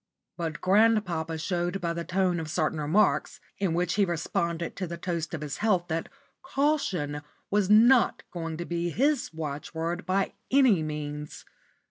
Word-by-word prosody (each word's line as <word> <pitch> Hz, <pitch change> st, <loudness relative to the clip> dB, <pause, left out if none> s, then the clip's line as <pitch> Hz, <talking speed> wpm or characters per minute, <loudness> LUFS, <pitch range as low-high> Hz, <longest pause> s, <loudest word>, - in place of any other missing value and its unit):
But 165 Hz, -3 st, -4 dB
grandpapa 185 Hz, -5 st, +2 dB
showed 175 Hz, +3 st, -1 dB
by 170 Hz, -2 st, -1 dB
the 170 Hz, 0 st, -4 dB
tone 185 Hz, -1 st, +1 dB
of 160 Hz, -1 st, -5 dB
certain 155 Hz, -1 st, 0 dB
remarks, 160 Hz, +9 st, +2 dB, 0.2 s
in 185 Hz, -5 st, 0 dB
which 180 Hz, +1 st, 0 dB
he 205 Hz, -, +3 dB
responded 170 Hz, -1 st, -2 dB
to 185 Hz, -, -3 dB
the 170 Hz, +1 st, -6 dB
toast 170 Hz, -2 st, -3 dB
of 155 Hz, -, -7 dB
his 150 Hz, -2 st, -4 dB
health, 185 Hz, -5 st, +1 dB
that 165 Hz, 0 st, -2 dB, 0.3 s
"caution" 195 Hz, -, 0 dB, 0.3 s
was 200 Hz, -1 st, +2 dB
not 235 Hz, +4 st, +5 dB
going 165 Hz, -2 st, -4 dB
to 170 Hz, -, -4 dB
be 170 Hz, 0 st, -2 dB
his 280 Hz, -, +1 dB
watchword 160 Hz, +2 st, -4 dB
by 190 Hz, +1 st, +1 dB, 0.2 s
any 255 Hz, -10 st, +5 dB
means. 150 Hz, -1 st, -5 dB
175 Hz, 155 wpm, -28 LUFS, 160-195 Hz, 0.3 s, not